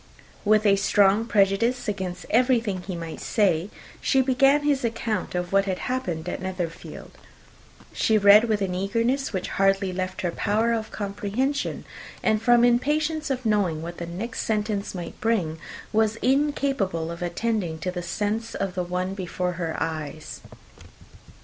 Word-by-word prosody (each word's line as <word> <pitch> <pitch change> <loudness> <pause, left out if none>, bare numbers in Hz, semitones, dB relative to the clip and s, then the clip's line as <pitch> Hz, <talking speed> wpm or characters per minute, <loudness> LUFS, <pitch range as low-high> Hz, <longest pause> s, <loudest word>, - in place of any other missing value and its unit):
With 215 +1 +3
a 200 -1 +5
strong 200 +2 +3
prejudice 220 +4 +2
against 185 -3 -4
everything 230 -5 +2
he 185 0 -6
might 165 -1 -6
say, 190 -4 +1 0.3
she 270 - +2
began 270 +3 +3
his 285 -3 +1
account 225 -4 -2
of 180 +1 -3
what 195 0 +4
had 190 -2 -1
happened 180 -11 -3
at - - -4
Netherfield. 180 -3 -6 0.8
She 220 - +2
read 205 +2 +7
with 215 -3 0
an 185 -2 -2
eagerness 230 +8 0
which 190 -4 -3
hardly 195 -1 +2
left 185 0 -3
her 175 - -1
power 220 +6 +1
of 220 -1 -2
comprehension; 210 +7 -2 0.4
and 215 -1 +2
from 240 +1 +5
impatience 300 +6 +1
of 255 -2 -2
knowing 190 -7 +1
what 170 +1 -7
the 170 - -5
next 200 +8 -4
sentence 210 -2 -2
might 175 -2 -7
bring, 185 -9 0 0.3
was 220 0 +2
incapable 270 - +1
of 170 - -8
attending 175 -1 -1
to 180 - -2
the 180 -1 -4
sense 210 +6 -2
of 195 -2 -2
the 180 0 -1
one 180 +2 -2
before 180 -1 -3
her 165 -2 -4
eyes. 155 -1 -5
200 Hz, 155 wpm, -25 LUFS, 180-230 Hz, 0.8 s, read